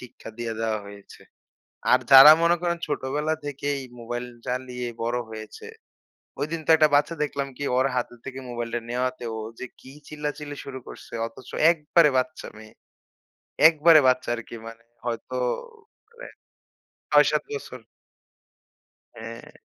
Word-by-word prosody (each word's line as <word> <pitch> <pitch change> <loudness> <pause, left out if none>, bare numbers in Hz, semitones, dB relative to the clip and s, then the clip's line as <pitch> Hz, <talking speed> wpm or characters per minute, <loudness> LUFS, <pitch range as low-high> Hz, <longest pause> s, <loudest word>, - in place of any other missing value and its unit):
শিক্ষা 125 -2 -12
দিয়ে 120 -1 -3
দেওয়া 110 -1 -1
হয়েছে। 100 0 -13 0.7
আর 125 - +6
যারা 135 +3 +11
মনে 170 +1 +4
করেন 170 -1 0
ছোটবেলা 150 +2 -1
থেকেই 140 0 -3 0.2
মোবাইল 120 +1 -5 0.2
চালিয়ে 125 -1 -4
বড় 120 +1 -1
হয়েছে। 110 - -9 0.7
ঐদিন 160 +3 -2
তো - - -9
একটা 155 -1 +4
বাচ্চা 150 +3 +2
দেখলাম 140 -2 -3
কি - - -5
ওর 130 - +3
হাতে 125 -1 -2
থেকে 135 -1 -7
মোবাইলটা 120 0 -3
নেওয়াতে 125 +1 -2
ও - - -5 0.2
যে - - -5
কি 130 - -14 0.2
চিল্লাচিল্লি 150 -1 -5
শুরু 130 -1 -7
করছে - - -12
অথচ 115 +3 -14 0.2
একবারে 155 -1 +3
বাচ্চা 155 +5 -2
মেয়ে। 110 0 -13 1.0
একবারে 160 0 +6
বাচ্চা 130 -1 +2
আরকি 115 0 -9
মানে 115 0 -11 0.2
হয়তো 120 +1 -4 0.7
হবে 470 +1 -12 0.8
৬-৭ - - +4
বছর। 435 - -7 1.3
হ্যাঁ। - - -10
130 Hz, 135 wpm, -25 LUFS, 120-150 Hz, 1.3 s, যারা